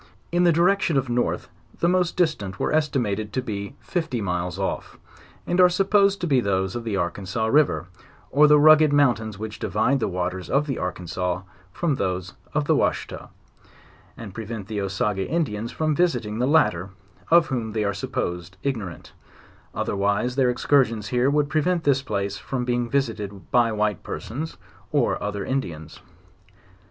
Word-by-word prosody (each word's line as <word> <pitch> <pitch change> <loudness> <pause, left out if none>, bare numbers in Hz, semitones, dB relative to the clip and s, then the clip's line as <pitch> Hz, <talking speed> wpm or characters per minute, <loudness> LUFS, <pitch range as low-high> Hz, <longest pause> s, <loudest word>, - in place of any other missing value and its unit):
In 175 +1 +3
the 170 - +6
direction 170 -1 +2
of 130 -2 0
north, 120 0 -1 0.3
the 170 - +2
most 180 -1 +1
distant 105 - 0
were - - 0
es 155 -1 +2
timated 110 -5 -1
to 130 - 0
be 100 +1 -5
fifty 160 -8 -2
milas 90 -3 -2
off, 95 -1 -3 0.5
and. 175 +1 +2
are 180 - +7
supposed 200 +2 +3
to - - 0
be 140 -6 +3
those 95 -3 0
of 120 - -4
the 110 -4 -2
Arkansas 95 +4 -2
river, 140 -4 +3 0.5
or 150 +2 +6
the 150 0 +7
rugged 155 0 +7
mountains 120 -8 +2
which 110 0 -6
divide 110 +8 +1
the - - 0
waters 90 -1 -3
of 140 +2 +2
the 135 -4 -3
A - - -4
rkansas 90 +1 -3 0.3
from 160 - 0
those 95 -5 -2 0.2
of 150 -1 +1
the - - +3
Washita, - - -1 0.9
and 110 -4 -8
prevent 110 -2 -6
the 105 -2 -3
Osage 100 +1 -1
Indians 115 - -2
from 155 -1 0
visiting 120 -11 0
the 125 - +2
latter, 100 - +2 0.4
of 170 0 +6
whom 115 -5 -2
they 110 -1 0
are 100 0 0
supposed 90 +2 -4
ignorant; 110 -11 -4 0.6
otherwise 100 +5 0
their 130 -2 +3
excursions 120 -4 +2
here 125 +2 +2
would 145 0 +2
prevent 165 +3 +1
this 140 -2 +3
place 100 -5 -3
from 125 -2 -3
being 120 -1 0
visited 105 -8 -2
by 120 -2 +4
white 105 -2 0
per - - -5
sons, 150 +8 -6 0.3
or - - +1
other 100 -1 -3
Indians. 85 - -4
115 Hz, 170 wpm, -24 LUFS, 100-150 Hz, 0.9 s, are